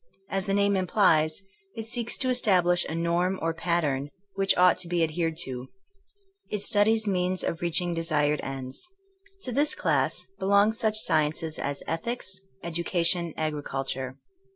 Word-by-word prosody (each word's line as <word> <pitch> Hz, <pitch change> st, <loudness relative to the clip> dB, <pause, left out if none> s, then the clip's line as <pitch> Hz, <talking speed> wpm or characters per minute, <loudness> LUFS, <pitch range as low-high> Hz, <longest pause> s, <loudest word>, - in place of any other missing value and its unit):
As 195 Hz, 0 st, -1 dB
the 195 Hz, -, +1 dB
name 200 Hz, 0 st, +3 dB
implies, 175 Hz, -3 st, +2 dB, 0.3 s
it 225 Hz, -, -5 dB
seeks 235 Hz, 0 st, 0 dB
to 260 Hz, -, 0 dB
establish 180 Hz, -8 st, +3 dB
a 160 Hz, -, -4 dB
norm 170 Hz, +3 st, 0 dB
or 165 Hz, 0 st, -1 dB
pattern 160 Hz, -5 st, -1 dB, 0.2 s
which 195 Hz, 0 st, +2 dB
ought 180 Hz, 0 st, +5 dB
to 180 Hz, -, -2 dB
be 170 Hz, -1 st, +1 dB
adhered 165 Hz, 0 st, -1 dB
to. 125 Hz, -1 st, -6 dB, 0.8 s
It 210 Hz, -1 st, 0 dB
studies 220 Hz, +2 st, +3 dB
means 185 Hz, -2 st, 0 dB
of 165 Hz, -, -3 dB
reaching 175 Hz, 0 st, +1 dB
desired 150 Hz, -3 st, +1 dB
ends. 135 Hz, -, -5 dB, 0.6 s
To 255 Hz, -, -1 dB
this 290 Hz, +4 st, +2 dB
class 160 Hz, +1 st, 0 dB
belong 200 Hz, +2 st, +4 dB
such 220 Hz, -1 st, 0 dB
sciences 155 Hz, -4 st, +1 dB
as 140 Hz, 0 st, -3 dB
ethics, 190 Hz, +2 st, -2 dB, 0.2 s
educa 170 Hz, +1 st, -1 dB
tion, 170 Hz, -2 st, +1 dB
agriculture. 135 Hz, -4 st, -3 dB
175 Hz, 150 wpm, -27 LUFS, 155-200 Hz, 0.8 s, ought